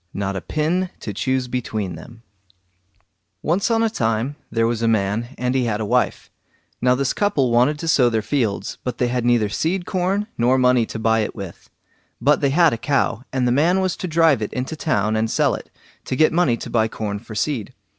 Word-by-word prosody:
NOT 100 -1 -2
A 95 - -3
PIN 170 - -1
TO 105 - -5
CHOOSE 130 +5 -1
BETWEEN 110 -6 -3
THEM 115 +8 -12 1.2
Once 180 +8 +1
on 225 0 +2
a - - +3
time 115 - -1 0.2
there 115 0 +1
was 115 -1 -1
a 115 - +1
man, 110 +1 +1
and 125 0 -1
he 130 -2 +1
had 110 -3 -1
a 110 - -2
wife. - - 0 0.5
Now 125 +1 +4
this 135 0 0
couple 145 - +1
wanted 125 +6 +3
to 165 - -5
sow 130 -7 +4
their 110 -2 -1
fields, 115 -8 -2
but 125 -2 -3
they 125 - +1
had 125 -1 -1
neither 120 -3 +3
seed 175 - -1
corn 190 +2 0
nor 125 +3 +3
money 125 -2 +3
to - - -6
buy 110 0 +2
it 110 - -2
with. 100 -5 -9 0.5
But 140 +4 +3
they 140 - +3
had 160 +1 +4
a 115 - -3
cow, 130 -3 0
and 125 -1 0
the - - +2
man 165 +8 +3
was 185 -2 0
to 185 - -4
drive 160 -6 +3
it 105 - -3
into 130 +5 -3
town 110 -9 0
and 110 +1 0
sell - - +2
it, - - -7 0.4
to - - -2
get 155 +4 +3
money 165 -9 +2
to - - -7
buy 110 -2 +2
corn 105 -2 -4
for 110 0 -11
seed. 125 -2 -2
125 Hz, 215 wpm, -21 LUFS, 110-150 Hz, 1.2 s, Now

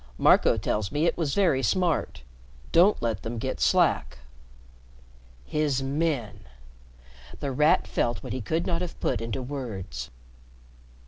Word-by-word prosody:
Marco - - +4
tells 105 -2 -2
me 150 +2 +1
it - - +2
was 155 -5 -1
very 170 -10 +3
smart. 160 - 0 0.5
Don't 185 +5 +5
let 110 -4 -1
them 115 +1 -5
get 130 +4 -3
slack." 160 - +2 1.3
"His 140 - 0
men!" 135 - -1 1.0
The 140 - -3
Rat 150 +4 +3
felt 120 -5 -1
what - - -5
he 130 - -3
could 160 +10 -1
not 170 -1 -1
have 180 -2 -6
put - - -1
into 115 +2 -4
words. 100 - -6
135 Hz, 135 wpm, -26 LUFS, 110-160 Hz, 1.3 s, Don't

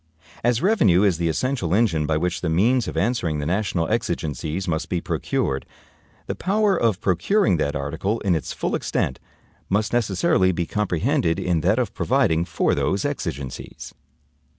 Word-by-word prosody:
As 120 +2 +1
revenue 110 - +4
is 95 -5 +2
the 85 -1 +1
essential 95 - 0
engine 85 -10 +2
by 80 0 +1
which 90 +2 -1
the 85 - -1
means 115 +9 +2
of - - -5
answering 90 -5 0
the 75 - -3
national 90 -1 0
exigencies 85 - -2
must 80 -1 -2
be 90 - 0
procured, 70 -4 -2 0.6
the - - -3
power 205 +1 +1
of 115 - +1
procuring 100 - +2
that 75 -1 -1
article 80 +10 -2
in 95 -3 +1
its 80 - -2
full - - -3
extent - - -1 0.5
must 105 +3 0
necessarily 95 -4 +2
be 85 -1 -2
comprehended 85 -4 0
in 90 -4 0
that - - +2
of - - -1
providing 80 +1 +1
for 85 -2 0
those 95 +1 0
exigencies. 65 -1 -5
90 Hz, 160 wpm, -23 LUFS, 80-110 Hz, 0.6 s, revenue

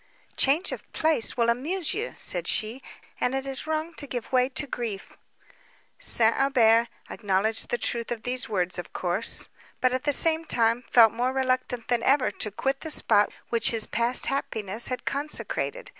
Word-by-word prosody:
"Change 295 +7 +1
of - - -8
place 315 -8 +1
will 235 -1 +2
amuse 300 +9 0
you," 450 +4 -4
said - - -2
she, 225 +4 -1 0.4
"and 250 - 0
it 270 0 -2
is 270 +2 -5
wrong 315 +1 -2
to 285 - -3
give 245 -4 -5
way 255 0 +3
to 280 +2 -1
grief." 230 -7 -5 0.8
St. 230 - +4
Aubert 235 -4 +4 0.2
acknowledged 210 +1 0
the 240 - 0
truth 235 0 -2
of 230 -2 -4
these 250 -1 -1
words 180 -3 -1
of 175 - -8
course; 185 +5 0 0.3
but, 255 0 +2
at 255 +2 -2
the 290 - +3
same 320 +3 +3
time, 230 -5 +1
felt 225 -3 +6
more 245 +2 0
reluctant 255 -3 -1
than 240 -2 +1
ever 265 -2 +2
to 210 - -2
quit 270 +7 -2
the 320 - -7
spot 205 -8 +4 0.2
which 235 -1 +2
his 225 -2 -1
past 235 +2 0
happiness 220 -5 -3
had 255 - -5
consecrated. 305 - -2
245 Hz, 175 wpm, -26 LUFS, 225-275 Hz, 0.8 s, felt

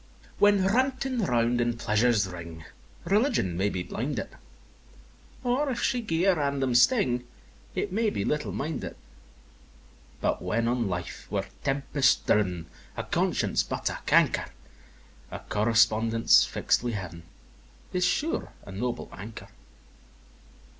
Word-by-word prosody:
X. - - -25
When 205 -2 +5
ranting 260 +4 +1
round 120 -1 +2
in 120 0 0
pleasure's 110 -1 +2
ring, 85 -3 -9 0.4
Religion 200 - +1
may 95 +3 +1
be 90 -3 -3
blinded; 125 +2 -3 1.1
Or 260 +4 +1
if 245 - -2
she 250 -2 +1
gie 170 -6 -1
a 195 - +5
random 140 -5 0
sting, 125 - +3 0.5
It 205 - -2
may 220 +1 +2
be 100 - -2
little 150 -1 -1
minded; 150 +1 -4 1.2
But - - 0
when 110 +6 0
on 120 -2 0
life 90 -1 -5
we're 100 -1 -1 0.2
tempest 135 -1 +1
driv'n, 90 -5 +1 0.3
A - - -2
conscience - - +1
but - - -2
a - - -6
canker - - +3 0.8
A - - -6
correspondence 115 +1 +3
fix'd - - +1
wi' 120 -1 -2
Heav'n 90 -5 -6 0.7
Is 180 0 +1
sure 315 - 0
a 100 - -10
noble 120 +5 -3
anchor! 110 +3 -9
120 Hz, 130 wpm, -27 LUFS, -, 1.2 s, When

